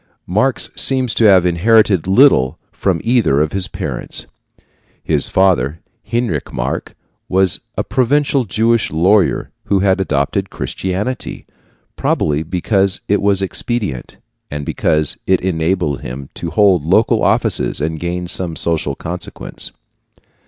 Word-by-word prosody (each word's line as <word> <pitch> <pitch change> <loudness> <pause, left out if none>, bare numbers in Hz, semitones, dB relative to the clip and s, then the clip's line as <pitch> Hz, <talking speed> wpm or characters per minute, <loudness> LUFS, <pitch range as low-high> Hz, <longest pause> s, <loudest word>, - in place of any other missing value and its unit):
Marx 110 +9 0
seems 130 -3 +1
to 115 - +2
have 95 -4 +6
inherited 95 0 +3
little 95 - +4
from 95 -4 -1
either 115 - +2
of 75 0 +1
his 95 -1 +1
parents. - - -4 0.8
His - - +2
father, 85 -6 +2 0.3
Heinrich 120 0 -1
Marx, - - -3 0.4
was 95 -1 +4 0.2
a - - 0
provincial 140 +1 +1
Jewish 115 +3 +1
lawyer 95 +6 +2
who 100 -2 +1
had 95 0 +2
adopted 70 -6 -1
Christianity, 95 +7 -4 0.5
probably 75 0 0
because 95 +3 0
it 105 - +1
was 100 -1 +2
expedient, 100 - -3 0.3
and 75 0 -5
because 75 0 0
it 95 -1 +3
enabled 85 -4 -1
him 65 +2 -7
to 85 - -5
hold 95 -2 +3
local 80 - +2
offices - - 0
and 80 +1 -2
gain 90 +1 -3
some 90 -2 -3
social 80 -4 -1
consequence. 90 +5 -6
95 Hz, 125 wpm, -17 LUFS, 80-105 Hz, 0.8 s, have